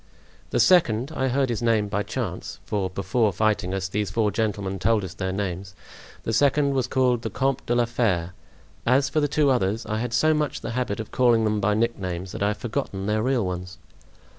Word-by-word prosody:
"The - - 0
second—I 130 -5 +3
heard 135 +1 +1
his 115 -2 -2
name 115 -3 +2
by 100 0 -1
chance; - - -5
for 100 -3 -1
before 100 +4 0
fighting 105 -1 0
us, 95 -1 -2
these 100 +1 -2
four 105 0 +1
gentlemen 100 -2 -2
told 110 +1 +2
us 95 -2 -6
their 95 0 -3
names; 95 -1 -4 0.5
the 115 - -2
second 140 +3 +3
was 130 -2 0
called 125 -2 +2
the - - -3
Comte 135 0 -1
de 120 - +1
la 120 0 +3
Fere. 95 -8 0 0.5
As 135 +3 +3
for 155 - +1
the 145 - +2
two 145 -1 +2
others, 115 -2 0
I 110 0 -2
had 120 0 -3
so 155 0 +4
much 150 -2 -1
the 115 - -4
habit 120 -4 -2
of 110 - -6
calling 120 -3 +3
them 105 -1 +1
by 105 +1 +1
nicknames 95 -5 -2
that - - -7
I 100 - +3
have 105 0 -1
forgotten 110 -4 -3
their 105 +1 +1
real 125 -3 +1
ones." 90 0 -5
110 Hz, 210 wpm, -24 LUFS, 100-125 Hz, 0.5 s, so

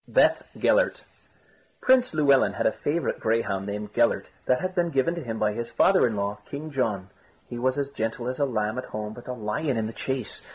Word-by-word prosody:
BETH - - +4 0.2
GELLERT - - +2 0.8
Print 255 -1 +4
Llewelyn 140 -4 +4
had - - -2
a - - +5
favourite 155 +5 -2
greyhound 110 -3 0
named 105 +1 -5
Gellert - - +2 0.2
that 125 0 +3
had 185 0 -3
been 175 -2 +1
given 140 +2 +1
to 170 -2 -5
him 115 -3 -4
by 105 -1 +1
his 115 +2 -4
father 185 +8 +4
in 110 - -2
law, 100 +1 -2
King 155 +2 -6
John. 105 -9 -1 0.4
He 120 - -6
was 130 +2 +1
as 140 -1 -1
gentle 115 -2 -3
as 130 +2 -3
a 140 - +3
lamb 110 -2 -1
at - - -5
home 105 0 -5
but 120 - -12
a 125 - -3
lion 120 +4 -2
in 110 - 0
the 110 - -5
chase. 130 -4 -3
125 Hz, 215 wpm, -26 LUFS, 110-145 Hz, 0.8 s, a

